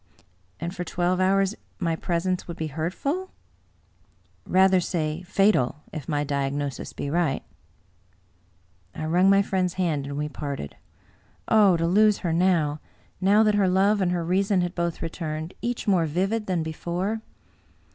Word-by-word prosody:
" 90 0 -39
And 170 +3 -4
for 180 - -3
twelve 175 +1 0
hours 195 +1 +2 0.2
my 165 -4 0
presence 175 +2 -2
would 170 -1 -6
be 160 - -2
hurtful? 275 - -2 0.4
" - - -37
" - - -38
Rather 190 0 +6
say 160 -2 -2
fatal, 180 -7 +1
if 155 -2 -6
my 145 -1 0
diagnosis 140 -1 -2
be - - -5
right." 170 -3 0 1.5
I 155 - -4
wrung 180 +4 +3
my 195 0 +5
friend's 185 -2 -1
hand, 160 -7 -1
and 140 0 -5
we 150 0 -1
parted. 140 - -6 0.7
Oh, 205 -5 +5
to 165 - 0
lose 210 +4 +4
her 165 - +1
now; 165 -4 +2 0.4
now 205 +3 +5
that 215 -1 +3
her 200 -2 +3
love 195 +3 +3
and. 180 -2 +1
her 175 -2 -1
reason 190 +2 +2
had 175 0 -2
both 170 -2 -2
returned, 160 0 -4
each 235 0 -3
more 180 -5 +3
vivid 195 +8 -1
than 180 -4 0
before! 175 +7 -3
175 Hz, 160 wpm, -25 LUFS, 155-195 Hz, 1.5 s, Rather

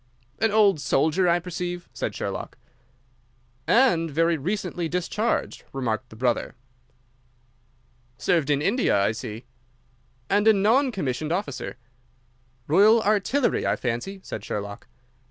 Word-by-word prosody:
"An 225 - +3
old 205 -5 +4
soldier, 155 +8 +2
I 170 - +4
perceive," 175 0 -5
said - - -4
Sherlock. - - -5 1.1
"And 215 -10 +4
very 165 +3 +2
recently 175 +1 -3
discharged," 180 +6 -1
remarked 120 -5 -2
the - - -13
brother. 120 +2 -1 1.6
"Served 165 -5 +1
in 145 0 +2
India, 210 - +2
I 100 - +2
see." 110 +1 -7 0.8
"And 205 +2 +2
a 220 - +8
non 230 +7 +3
commissioned 150 - -3
officer." 190 +4 -3 0.9
"Royal 205 - +5
Artillery, 215 +6 +1
I - - +2
fancy," 125 +11 -3
said 105 - -6
Sherlock. 100 0 -5
175 Hz, 120 wpm, -25 LUFS, 135-205 Hz, 1.6 s, a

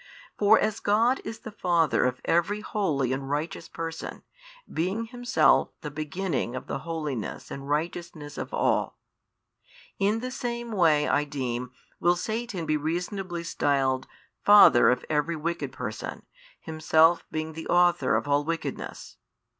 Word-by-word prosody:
For 210 +2 +5
as 215 0 0
God 230 +5 +2
is 225 - -7
the 220 - -8
Father 170 - +2
of 125 0 -1
every 195 +5 +1
holy 150 - 0
and 135 0 -4
righteous 150 +3 -3
person, 165 0 -6 0.4
being 190 +8 -2
Himself 245 +2 +3
the 150 - -6
beginning 155 -3 -3
of 130 - -5
the 135 - -4
holiness 150 -7 -5
and 140 0 -7
righteousness 155 -1 -3
of - - -5
all: - - 0 1.0
in 205 +3 +2
the 255 +2 -5
same 240 -2 -4
way 160 -7 +3
I 145 - +2
deem 125 -4 -3 0.3
will 175 +1 +3
Satan 215 -1 -3
be 155 0 +1
reasonably 175 +3 -3
styled 135 -5 0 0.4
father 205 -11 +8
of 125 - 0
every 155 +2 0
wicked 170 +2 -3
person, - - -6 0.3
himself 160 +1 +3
being 155 0 -4
the 160 +1 -7
author 175 0 +3
of - - -1
all 145 0 +2
wickedness. 165 +2 -5
165 Hz, 140 wpm, -27 LUFS, 145-200 Hz, 1.0 s, father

